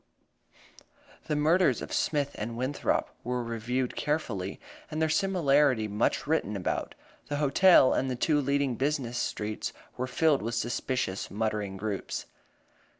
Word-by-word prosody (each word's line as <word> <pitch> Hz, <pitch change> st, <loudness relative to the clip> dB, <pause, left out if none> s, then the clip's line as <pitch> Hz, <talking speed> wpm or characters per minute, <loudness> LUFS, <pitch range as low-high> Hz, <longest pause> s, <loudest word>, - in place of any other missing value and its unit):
The 150 Hz, -, 0 dB
murders 155 Hz, -3 st, +3 dB
of -, -, -6 dB
Smith 145 Hz, -2 st, 0 dB
and 115 Hz, +2 st, -5 dB
Winthrop 130 Hz, +4 st, -1 dB
were 125 Hz, 0 st, -2 dB
reviewed 120 Hz, +2 st, -2 dB
carefully, 115 Hz, -11 st, -2 dB, 0.3 s
and 155 Hz, -, -4 dB
their 160 Hz, 0 st, +2 dB
similarity 150 Hz, -, +3 dB
much 105 Hz, 0 st, 0 dB
written -, -, 0 dB
about. -, -, -2 dB, 0.3 s
The 145 Hz, -, -2 dB
hotel 145 Hz, +1 st, +6 dB
and 135 Hz, -, 0 dB
the 130 Hz, -, -1 dB
two 145 Hz, +4 st, +2 dB
leading 140 Hz, -3 st, 0 dB
business 130 Hz, -4 st, -1 dB
streets 105 Hz, 0 st, -3 dB, 0.2 s
were 130 Hz, -, -2 dB
filled 150 Hz, +2 st, +2 dB
with 115 Hz, +2 st, -3 dB
suspicious, 120 Hz, -4 st, -2 dB
muttering 105 Hz, -2 st, -2 dB
groups. 100 Hz, 0 st, -4 dB
130 Hz, 135 wpm, -29 LUFS, 115-150 Hz, 0.3 s, hotel